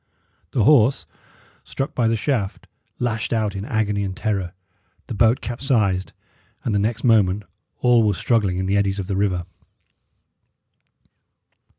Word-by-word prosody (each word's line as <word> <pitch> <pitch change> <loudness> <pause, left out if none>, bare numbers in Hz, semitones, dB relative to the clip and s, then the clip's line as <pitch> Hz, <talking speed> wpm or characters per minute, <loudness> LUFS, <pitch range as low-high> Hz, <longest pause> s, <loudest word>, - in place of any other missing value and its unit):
The 120 - +1
horse, 130 -2 +4 0.6
struck 135 - -4
by 120 -3 +1
the 115 - +2
shaft, 110 -4 -2 0.3
lashed 115 -2 -2
out 110 -3 0
in 100 +1 -4
agony 105 -2 0
and 95 -1 -4
terror; 95 -5 -2 0.5
the - - -6
boat 115 +3 +3
capsized, 115 -7 0 0.5
and 115 - 0
the 100 - +2
next 110 +3 -1
moment 105 -4 +3 0.4
all 120 -2 +5
were 105 -3 +2
struggling 105 -6 +1
in 95 - -1
the 100 +2 +1
eddies 100 -1 +1
of 100 - -3
the 100 +1 -3
river. 95 -3 0
105 Hz, 145 wpm, -22 LUFS, 100-115 Hz, 0.6 s, all